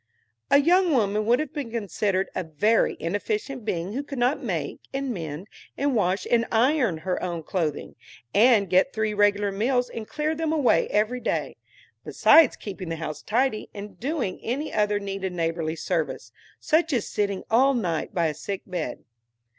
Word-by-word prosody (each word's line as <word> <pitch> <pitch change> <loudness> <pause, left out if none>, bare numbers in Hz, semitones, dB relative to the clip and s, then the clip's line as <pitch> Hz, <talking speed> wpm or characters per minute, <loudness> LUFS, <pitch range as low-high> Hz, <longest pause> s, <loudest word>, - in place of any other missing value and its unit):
A - - +6
young 350 +4 +4
woman 210 -3 +1
would 240 +1 +5
have 305 -1 -4
been 285 -6 -4
considered 205 -3 -1
a 185 - -2
very 205 +8 +1
inefficient 260 - -3
being 185 -2 -3
who 270 - -2
could 280 -1 -8
not 245 +4 +1
make - - -3
and 270 -2 -2
mend 165 0 -6 0.3
and 280 0 +1
wash 190 -2 +1
and 230 -1 +3
iron 240 - +2
her 185 -1 -1
own 170 -3 -3
clothing, 155 -4 -2 0.4
and 215 -2 +5
get 185 +9 +3
three 215 -1 -1
regular 205 0 +2
meals 245 +5 0
and 220 -2 -6
clear 305 +1 -1
them 320 0 -2
away 295 -6 +3
every 215 +4 0
day, - - -2 0.5
besides 320 -5 +5
keeping 190 -4 -7
the 165 - -2
house 155 -2 -5
tidy, 235 0 0
and 200 -2 -9
doing 260 - -2
any 275 +7 -3
other 210 -1 +1
needed 195 -2 -4
neighborly 165 -1 -2
service, 165 -2 -3 0.3
such 325 +1 +2
as 235 -5 0
sitting 200 -2 -2
all 265 +4 +4
night 175 -9 -2
by 170 -4 0
a 155 - 0
sick 190 +6 -5
bed. 175 -9 -4
210 Hz, 170 wpm, -25 LUFS, 185-260 Hz, 0.5 s, A